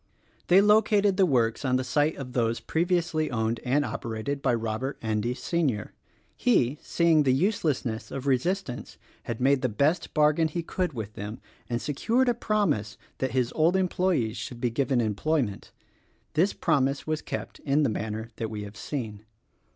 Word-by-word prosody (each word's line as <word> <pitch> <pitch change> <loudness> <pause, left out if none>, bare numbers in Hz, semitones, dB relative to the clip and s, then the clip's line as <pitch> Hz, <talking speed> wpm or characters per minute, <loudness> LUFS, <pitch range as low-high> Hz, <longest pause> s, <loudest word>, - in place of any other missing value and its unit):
They 185 +2 +7
located 210 -2 +4
the 190 -2 +5
works 120 -4 +1
on 130 -2 +1
the 130 - +1
site 150 +4 +1
of 125 -3 -7
those 115 -2 +1
previously 165 +1 0
owned 115 -1 -1
and 145 +4 +2
operated 115 +5 -4
by 125 -3 +2
Robert 115 +4 -3
Endy, 110 +2 -1
Sr. 130 -5 -1 0.4
He, 145 - +2
seeing 165 -2 +3
the 135 -3 +3
uselessness 140 - 0
of 135 0 -5
resistance 140 +1 -1 0.3
had 115 -2 -4
made 135 +1 +3
the 130 - +1
best 140 - 0
bargain 155 +1 +4
he 170 +2 -4
could 180 0 -2
with 110 -4 -6
them 105 +3 -6 0.3
and 120 -1 -1
secured 230 - +1
a - - +3
promise 160 - 0 0.2
that 130 -2 -1
his 125 -2 0
old 165 +3 +3
employes 180 - +1
should 115 +3 -6
be 120 -1 0
given 130 +1 +1
employment. 115 +1 -1 0.6
This 175 +6 +3
promise 140 -4 +1
was 155 0 -1
kept - - -6
in 145 +1 +1
the - - +3
manner 110 0 -4
that 115 - -3
we 105 -1 -5
have 105 0 -10
seen. 110 -8 -5
135 Hz, 165 wpm, -27 LUFS, 115-165 Hz, 0.6 s, They